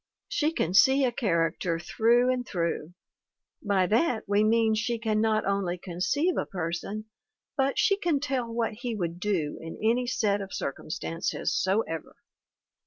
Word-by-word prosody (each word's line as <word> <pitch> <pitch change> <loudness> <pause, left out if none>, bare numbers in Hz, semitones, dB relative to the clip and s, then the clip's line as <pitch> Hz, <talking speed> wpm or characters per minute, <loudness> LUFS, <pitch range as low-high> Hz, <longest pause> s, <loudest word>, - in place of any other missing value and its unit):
She 320 -11 +1
can 180 - -1
see 265 +8 +6
a 250 - +1
character 170 -5 0
through 235 +8 +3
and 250 -1 -2
through. 170 -5 -3 0.7
By 200 -3 +2
that 225 - +1
we 205 +1 +3
mean 225 0 +3
she 225 +2 0
can 220 -1 0
not 220 -1 +2
only 195 -3 0
conceive 185 - -1
a - - -1
person, 180 +4 -4 0.5
but 270 -1 +1
she 395 - +3
can 340 -7 +1
tell 260 -5 -2
what 230 -1 -1
he 240 +1 -4
would 175 -3 -3
do 180 -7 -1
in 165 0 -7
any 235 +3 +1
set 205 -4 +1
of 195 -1 -6
circum 140 - -5
stances 165 +1 -2
soever. 190 -5 -1
215 Hz, 160 wpm, -27 LUFS, 180-240 Hz, 0.7 s, see